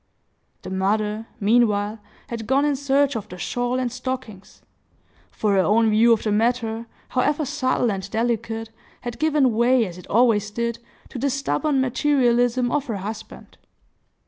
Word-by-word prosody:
The - - -7
mother, 210 +3 -1
meanwhile, 210 -1 +2 0.3
had 230 -2 -5
gone 275 +3 +3
in 295 -1 +1
search 280 +1 +1
of 220 - -5
the 180 - -9
shawl 245 +6 -2
and 250 -2 -1
stockings; 250 -6 -6 0.7
for 210 - -1
her 195 - +3
own 220 +3 +3
view 225 +2 +5
of 225 - +3
the 215 - 0
matter, 230 +1 0 0.2
however 290 +4 +1
subtle 255 -4 0
and 195 0 -5
delicate, 225 0 -2 0.3
had 240 -1 -6
given 300 -5 +3
way, 240 +1 +3
as 180 -2 -8
it - - -13
always 215 -2 +3
did, 235 +2 -3 0.3
to 250 - -7
the 280 - +1
stubborn 275 +1 0
materialism 245 -2 +2
of 290 -1 -1
her 220 -4 -2
husband. 210 +3 -8
235 Hz, 155 wpm, -23 LUFS, 215-255 Hz, 0.7 s, view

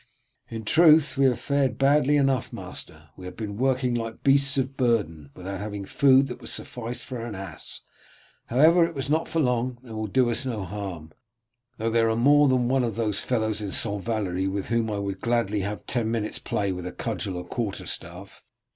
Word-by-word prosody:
"In 110 -1 -6
truth 155 +2 +5
we 135 0 +3
have 125 -2 +2
fared 140 -2 0
badly 145 +1 +4
enough, 135 -3 +1
master; 75 -1 -9
we 95 - -11
have 90 0 -8
been 105 -3 -5
working 130 +1 +1
like 115 -1 -4
beasts 140 +1 +3
of 135 0 -1
burden, 105 - 0
without 95 +1 -6
having 105 -1 -5
food 135 +4 +4
that 125 - -8
would - - -7
suffice 120 0 -5
for 125 -3 -6
an 115 -3 -5
ass. 95 -4 -8 0.7
However, 160 +8 +5
it 165 - -1
was 140 +1 -3
not 160 +1 +1
for 165 - -1
long, 125 -3 0
and 115 -3 -9
will 110 0 -3
do 125 +3 +2
us 120 - -1
no 115 -6 -3
harm, 90 -5 -6 0.7
though 115 +1 -1
there 115 0 +3
are 110 - +1
more 145 +5 +5
than 130 -2 +2
one 130 +1 +2
of 115 -2 -2
those 110 -3 -1
fellows 110 -3 -1
at 100 -2 -4
St. 105 -2 0
Valery 95 -4 -1
with 95 0 -3
whom 115 -1 +1
I 105 - -2
would 100 -1 -4
gladly 115 -3 0
have 100 +2 -4
ten 120 -3 -1
minutes 110 -2 -2
play 100 -2 -1
with 90 -1 -6
cudgel 95 -5 -3
or 90 - -6
quarter 105 +1 -4
staff. - - -6
115 Hz, 200 wpm, -25 LUFS, 100-130 Hz, 0.7 s, truth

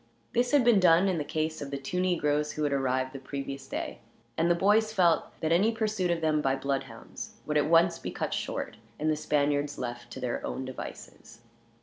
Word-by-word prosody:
This 245 +1 +2
had 290 -3 +5
been 235 -4 +5
done 175 +1 +5
in 180 -4 0
the - - -1
case 155 +1 -2
of 140 - -5
the 140 - -3
two 140 +7 -3
negroes 150 -5 +1
who 155 - -2
had 145 -1 +1
arrived 130 -1 0
the 135 - -6
previous 140 0 -6
day, - - -4 0.4
and 165 +2 +2
the 175 - +4
boys 210 +5 +3
felt 175 -6 +3 0.2
that 160 - 0
any 195 +7 +4
pursuit 215 -5 -1
of 170 -1 0
them 155 -1 +2
by 135 -2 +1
bloodhounds 135 0 -5
would - - -2
at - - +2
once - - +4
be - - -5
cut - - -3
short, - - -3 0.2
and 155 +1 +1
the - - +1
Spaniards 145 -1 0
left 120 -1 -5
to - - -7
their 125 -2 -3
own 130 - -4
devices. 130 -2 -9
150 Hz, 215 wpm, -29 LUFS, 135-180 Hz, 0.4 s, had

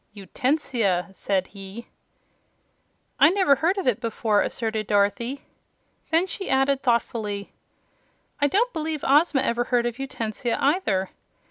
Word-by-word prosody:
"Utensia," 210 - -1
said 190 -1 -1
he. 200 +4 -10 1.3
"I 285 - +8
never 375 -5 +3
heard 355 +5 +1
of 390 - -2
it 245 -3 +2
before," 225 -2 +1
asserted 220 -2 -2
Dorothy. 210 +7 0 0.7
Then 330 +3 +3
she 385 0 -6
added 270 0 +2
thoughtfully, 220 -5 -1 0.9
"I 285 - +5
don't 465 - +1
believe 315 -2 -3
Ozma 290 0 +4
ever 240 +1 0
heard 240 -1 +1
of 240 +1 -3
Utensia, 235 -3 -3
either. 245 - +1
240 Hz, 125 wpm, -24 LUFS, 210-290 Hz, 1.3 s, I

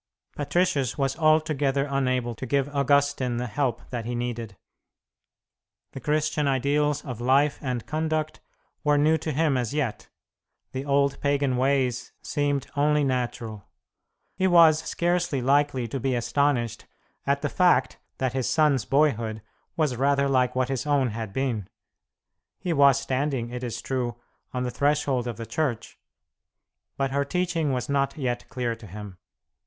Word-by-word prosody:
Patricius 145 -3 0
was 135 -1 0
altogether 155 -3 +2
unable 130 -3 0
to 130 +3 -7
give 140 +2 0
Augustine 140 -3 +2
the 125 - -2
help 120 +1 -2
that 120 -2 -3
he 120 +1 -3
needed. 120 -4 -4 1.3
The - - -7
Christian 150 0 0
ideals 145 +2 +1
of 125 -4 -6
life 140 +4 +3
and 125 -4 -3
conduct 155 0 -2 0.4
were 150 -1 +3
new 155 +2 +3
to 155 +1 -3
him 150 -1 +1
as 125 +2 -2
yet; 110 -10 -2 0.6
the 135 +1 -4
old 140 -1 +1
pagan 140 -2 +1
ways 130 -1 0
seemed 145 -2 -1
only 150 +1 +3
natural. 120 -5 -3 0.7
He 190 - +1
was 165 -3 +6
scarcely 175 -3 0
likely 135 -1 +2
to 135 - -3
be 130 0 0
astonished 120 -1 0 0.4
at 140 +1 +1
the - - +2
fact 175 -6 +2 0.2
that 130 -2 -1
his 130 -2 -1
son's 150 -7 +3
boyhood 115 -7 +1 0.3
was 150 -6 +1
rather 140 +1 +2
like 125 -2 +2
what 130 0 +1
his 135 +1 -2
own 140 -4 +2
had 110 -1 -5
been. 115 -5 -2 0.9
He 175 - -2
was 140 -3 +5
standing, 130 -3 -2
it 125 +1 -5
is 120 -2 -4
true, 125 -3 -2 0.3
on 125 0 -2
the 125 - -2
threshold 140 -3 +1
of 120 -3 -4
the 115 - -6
Church, 130 -4 -3 1.0
but 135 -1 0
her 140 +1 +1
teaching 170 -1 -1
was 125 0 -2
not 140 +1 0
yet 120 -4 -3
clear 120 -2 -2
to 110 - -12
him. 100 -1 -9
135 Hz, 150 wpm, -26 LUFS, 125-145 Hz, 1.3 s, was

